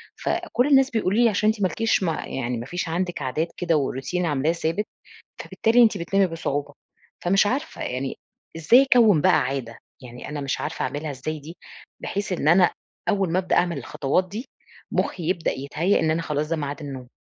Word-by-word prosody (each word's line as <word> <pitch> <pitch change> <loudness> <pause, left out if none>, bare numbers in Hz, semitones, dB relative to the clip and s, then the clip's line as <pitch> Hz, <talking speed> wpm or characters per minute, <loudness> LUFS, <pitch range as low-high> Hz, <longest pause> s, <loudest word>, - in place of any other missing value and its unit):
فكل 250 +3 -1
الناس 270 -2 +5
بيقولوا 215 -2 0
لي 240 -1 +5
عشان 215 0 +2
أنتِ 220 -1 -1
ما 190 - +4
لكيش 225 -1 0
م 170 - +1
يعني 125 -5 -3
ما 115 - -5
فيش 175 +2 -4
عندِك 175 -2 -2
عادات 145 +5 -1
كده 175 -2 +1
وRoutine 145 +5 -1
عاملاه 150 0 +1
ثابت، 165 +4 -1 0.5
فبالتالي 235 +2 +3
أنتِ 220 -2 +3
بتنامي 195 +2 +1
بصعوبة، 145 -3 -3 0.5
فمش 195 +3 +3
عارفة 280 +8 -3
يعني 130 +2 -3 0.4
إزاي 240 - +6
أكوِّن 210 -10 +6
بقى 185 -3 +5
عادة؟ 125 -3 -3 0.2
يعني 125 -1 -9
أنا 150 -1 -4
مش 135 -1 -2
عارفة - - -3
أعمِلها 150 +1 -4
إزاي 150 +4 -5
دي، 160 +5 -11 0.4
بحيث 200 -1 -3
إن 165 -4 -1
أنا 175 +2 +6 0.4
أول 195 -5 +1
ما 185 - +2
ابدأ 185 - 0
أعمل 175 -1 +2
الخطوات 165 +7 -1
دي، 220 +7 -6 0.5
مخّي 175 - -1
يبدأ 175 -3 0
يتهيأ 155 +8 0
إن 160 -1 +2
أنا 165 +1 0
خلاص 150 -1 -2
ده 165 - +1
ميعاد 145 -1 -4
النوم. 135 -3 -7
165 Hz, 190 wpm, -24 LUFS, 145-195 Hz, 0.5 s, إزاي